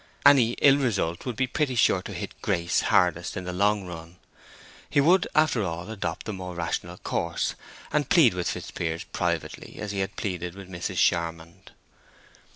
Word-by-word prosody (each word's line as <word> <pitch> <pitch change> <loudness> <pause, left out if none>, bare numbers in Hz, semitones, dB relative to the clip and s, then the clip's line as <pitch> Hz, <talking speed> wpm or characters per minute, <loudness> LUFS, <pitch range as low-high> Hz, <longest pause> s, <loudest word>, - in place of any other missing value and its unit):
Any 130 -5 +6
ill 140 +1 +5
result 100 -8 -1
would 125 - -2
be 130 - +1
pretty 130 +1 -1
sure 115 - +3
to - - -8
hit - - -7
Grace 85 0 +1
hardest 85 -1 +2
in 95 - -4
the 90 0 -5
long 100 +1 +2
run. 85 -1 -9 0.7
He - - +2
would, 175 +6 +4
after 155 -7 +3
all, 85 +1 -4
adopt 90 -6 -4
the 110 - -4
more 90 -2 -6
rational 85 +1 -3
course, - - -2 0.4
and 145 -3 +1
plead 160 - +6
with 90 -1 -2
Fitzpiers 80 -1 -4
privately, - - -3
as 105 -1 -4
he 100 - -3
had 95 +1 -2
pleaded 90 -3 -4
with 95 -1 -11
Mrs. 90 -1 -4
Charmond. 85 -1 -1
95 Hz, 170 wpm, -26 LUFS, 85-120 Hz, 0.7 s, Any